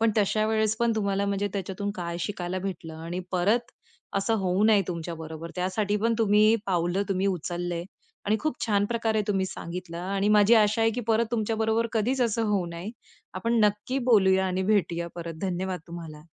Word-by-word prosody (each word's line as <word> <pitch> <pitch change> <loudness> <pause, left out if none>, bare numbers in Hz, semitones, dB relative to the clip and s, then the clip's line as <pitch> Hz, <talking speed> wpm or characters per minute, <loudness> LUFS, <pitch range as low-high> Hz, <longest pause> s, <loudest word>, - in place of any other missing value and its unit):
पण 225 0 +4
तशा 215 +1 +2
वेळेस 220 0 +1
पण 235 0 +2
तुम्हाला 200 -1 0
म्हणजे 200 0 0
त्याच्यातून 200 +1 -3
काय 170 -1 -4
शिकायला 185 -1 -3
भेटलं 175 -4 -5
आणि 170 +3 -5
परत 220 +7 +1 0.5
असं 210 +3 +1
होऊ 190 +1 +1
नये 215 -2 +5
तुमच्याबरोबर, 165 -1 -6
त्यासाठी 195 +3 0
पण 230 +2 +1
तुम्ही 215 0 +5
पावलं, 175 +1 +1
तुम्ही 195 0 0
उचललंय 175 -1 -2 0.4
आणि 210 +2 +2
खूप 310 -3 -1
छान 205 -2 +2
प्रकारे 225 -2 0
तुम्ही 195 -2 +1
सांगितलं 170 -1 -6
आणि 195 +3 -1
माझी 210 +2 +6
आशा 220 0 +4
आहे 225 - +4
की 245 - -2
परत 225 +1 +2
तुमच्या 225 -1 -1
बरोबर 225 +1 +1
कधीच 240 +4 0
असं 230 -1 +1
होऊ 195 -4 +1
नये. 170 +4 -6 0.4
आपण 230 +5 0
नक्की 210 +6 0
बोलूया 190 -3 +5
आणि 185 0 -1
भेटूया 175 -4 +1
परत. 170 -1 -6
धन्यवाद 185 -1 -2
तुम्हाला. 165 -3 -8
200 Hz, 175 wpm, -27 LUFS, 180-220 Hz, 0.5 s, माझी